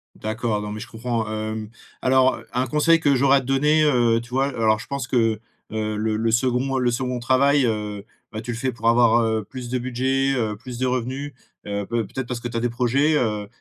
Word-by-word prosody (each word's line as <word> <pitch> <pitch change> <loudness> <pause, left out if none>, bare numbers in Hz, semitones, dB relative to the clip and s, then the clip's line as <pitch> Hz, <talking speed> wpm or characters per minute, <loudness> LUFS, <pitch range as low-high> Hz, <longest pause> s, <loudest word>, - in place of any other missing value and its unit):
D'accord, 110 0 -2
non, 105 0 -5
mais 105 - -5
je 115 - -7
comprends. 115 -1 -3
Hem, 110 0 -4 0.3
alors 130 0 +3
un 125 +1 +1
conseil 160 +5 +3
que 145 -4 +3
j'aurais 135 +1 +4
à - - 0
te - - -12
donner, 150 +4 +3
heu, 120 -6 +3
tu 120 - -13
vois? 135 +2 +1
Alors, 110 -5 +1
je - - -9
pense 140 -2 -4
que, 115 -5 +1 0.3
heu, 110 0 -2
le 110 +1 -1
le 115 +1 0
2d 130 +2 +1
le 125 -1 +2
2d 125 0 -2
travail, 130 +3 +3
heu, 105 -2 -3 0.3
bah, 110 - -5
tu 120 +2 -5
le 115 - -5
fais 130 +2 -1
pour 115 -1 0
avoir, 120 0 +5
heu, 110 -2 0
plus 125 +1 -7
de 125 - 0
budget, 130 +2 0
heu, 110 -4 -1
plus 120 +2 -8
de 130 - +1
revenu, 130 +3 -3 0.3
heu, 100 0 -2
peut 115 +1 -1
peut-être 130 +3 -5
parce 125 -1 -4
que 120 - -4
tu 115 - -4
as - - +1
des 120 +1 0
projets, 130 +6 +1
heu, 105 -6 0
120 Hz, 235 wpm, -23 LUFS, 110-130 Hz, 0.3 s, avoir